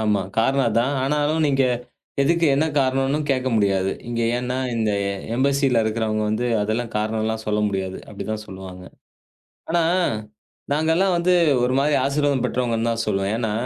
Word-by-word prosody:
ஆமா. 105 -3 +1 0.2
காரணம்தான். 125 +1 +1
ஆனாலும் 150 +2 +1
நீங்க 135 -1 +2 0.6
எதுக்கு 170 +3 +2
என்ன 155 +3 +2
காரணன்னு 135 +2 +1
கேட்க 130 -1 +1
முடியாது. 95 -2 +1 0.2
இங்க 120 0 -2 0.2
ஏன்னா 125 +1 -2 0.2
இந்த 110 -2 +1 0.4
எம்பஸில 135 -2 +2
இருக்கிறவுங்க 110 -1 -1
வந்து 120 +3 -1 0.2
அதெல்லாம் 110 +2 -2
காரணம் 110 +1 -1
எல்லாம் 110 0 -2
சொல்ல 105 0 0
முடியாது. 95 -1 -3
அப்பிடிதான் 110 -1 -5
சொல்லுவாங்க. 95 -1 -9 0.9
ஆனா 170 0 +2 0.9
நாங்கள்லாம் 160 +5 +2
வந்து 175 +1 +2 0.3
ஒரு 125 - 0
மாதிரி 145 +1 +2
ஆசீர்வாதம் 140 -2 +1
பெற்றவங்கன்னுதான் 115 -2 0
சொல்லுவேன். 100 0 0
ஏன்னா 110 -3 -1
120 Hz, 135 wpm, -22 LUFS, 110-140 Hz, 0.9 s, நீங்க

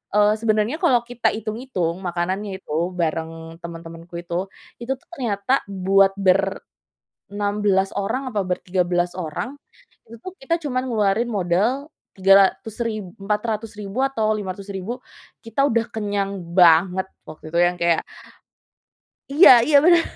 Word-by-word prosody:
eee, 210 0 +5
sebenarnya 220 +4 +1
kalau 255 -9 +4
kita 245 0 0
hitung-hitung 215 -6 -3
makanannya 190 +3 -3
itu 150 - -6 0.2
bareng 165 0 -3
teman-temanku 165 0 -9
itu 175 +2 -3 0.4
itu 235 - -4
tuh - - -32
ternyata 240 +2 0
buat 195 0 +3
ber, 195 0 +2 0.7
16 205 -1 +1
orang 255 +7 -2
atau 200 - +1
ber 180 - 0
13 175 -1 0
orang 180 - -4 0.5
itu 230 - -11
tuh 370 0 -7
kita 270 +5 -1
cuman 255 -3 -2
ngeluarin 220 +1 +1
modal 210 - 0 0.3
Rp300.000 195 +2 +2 0.2
Rp400.000 210 0 -3
atau 220 -5 0
Rp500.000 200 +3 -6
ribu - - -38 0.4
kita 230 +4 -3
udah 230 -4 +2
kenyang 200 -3 -2 0.2
banget 180 +2 +5 0.2
waktu 155 0 -11
itu - - +2
yang 175 0 +2
kayak. 170 -1 +2 1.3
Iya 285 +2 +8
iya 295 +1 +4
bener. 345 -1 +6
200 Hz, 130 wpm, -22 LUFS, 180-230 Hz, 1.3 s, Iya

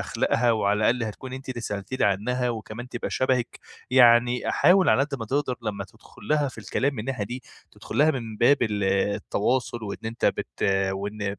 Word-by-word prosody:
أخلاقها، 120 0 +1
وعلى 105 -1 +1
الأقل 125 0 -1
هتكوني 130 +4 -6
أنتِ 130 0 -12
اللي 125 -2 -4
سألتِ 100 -1 -5
لي - - +1
عنها 120 +6 0
وكمان 115 +1 -7
تبقى 120 -1 -5
شبهك." 130 -2 0 0.3
يعني 120 -1 +5
حاول 185 +1 +4
على - - +4
قد 145 0 -3
ما 115 - -4
تقدر 130 +2 -1
لمّا 100 -3 -3
تدخل - - -19
لها 150 -2 +2
في 125 - -12
الكلام 130 +6 -1
من 115 - -4
الناحية 125 -2 -3
دي، 125 +5 -7 0.3
تدخل - - -7
لها 150 +2 +5
من 115 -6 -5
باب 135 +6 +5
التواصل 105 +3 0
و 100 - -4
إن - - -7
أنتَ 115 +1 -4
بت - - -3 0.3
وإن 100 +1 -4
120 Hz, 190 wpm, -25 LUFS, 105-130 Hz, 0.3 s, يعني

